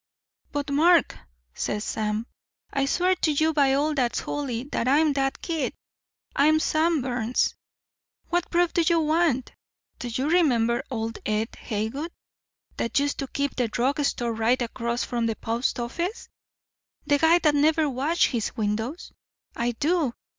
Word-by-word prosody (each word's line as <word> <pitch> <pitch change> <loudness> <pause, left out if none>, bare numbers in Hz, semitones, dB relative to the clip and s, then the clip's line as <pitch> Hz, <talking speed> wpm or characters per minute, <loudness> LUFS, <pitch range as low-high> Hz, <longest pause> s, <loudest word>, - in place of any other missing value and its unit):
"'But, 285 -1 -3
Mark,' 330 +3 +4 0.4
says 210 0 -2
Sam, 215 0 -2 0.5
'I 275 -1 +1
swear 365 +5 +2
to 310 - +1
you 315 +2 +2
by 280 -3 +3
all 300 +2 +1
that's 250 -5 0
holy 255 -5 -3
that 235 - -1
I'm 295 +3 +4
that 270 -1 -1
kid 325 -3 -2 0.6
I'm 310 +3 +4
Sam 315 -2 +1
Burns. 245 -1 0 0.8
What 350 0 0
proof 350 0 +2
do 345 - +3
you 340 -1 +4
want? 310 -5 +1 0.5
Do 245 - -4
you 255 +4 -2
remember 255 -8 +2
old 225 -3 -3
Ed 215 +1 -1
Haywood 225 +10 -4 0.7
that 230 - -1
used 285 +1 +1
to 275 - -2
keep 280 +1 -2
the 245 -2 +1
drug 250 +6 0
store 240 -4 -1
right 225 +3 +2
across 235 0 -2
from 235 -1 -1
the 225 - -1
post 230 +4 -2
office? 340 - -4 0.8
The 285 0 +3
guy 325 +2 +5
that 310 -4 +3
never 305 +2 +3
washed 285 +6 +1
his 230 -4 -2
windows? 220 +9 -2 0.4
I 240 +1 -1
do. 300 -1 0
275 Hz, 155 wpm, -25 LUFS, 235-315 Hz, 0.8 s, guy